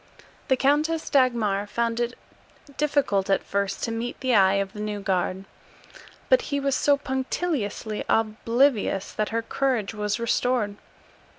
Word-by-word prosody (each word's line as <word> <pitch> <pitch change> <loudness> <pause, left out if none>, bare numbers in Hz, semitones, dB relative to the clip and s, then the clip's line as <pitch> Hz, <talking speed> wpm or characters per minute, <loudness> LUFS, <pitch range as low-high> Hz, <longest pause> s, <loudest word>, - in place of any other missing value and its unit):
The 260 -3 +3
Countess 305 +4 +1
Dagmar 225 -7 +2
found 230 +2 -1
it 240 +1 -2 0.6
difficult 275 -10 +1
at 195 - +2
first 200 -1 -2
to 230 - -1
meet 230 +2 -4
the 260 -2 0
eye 195 -2 +5
of 195 0 -1
the 210 - -9
new 210 -1 -3
guard, 190 0 -1 0.8
but - - +5
he 285 -1 0
was 275 0 0
so 285 -1 +3
punctiliously 265 - -2
oblivious 225 -1 +1
that 215 - -1
her 230 0 -1
courage 250 -6 -1
was 210 0 -2
restored. 235 -3 0
230 Hz, 140 wpm, -25 LUFS, 205-265 Hz, 0.8 s, eye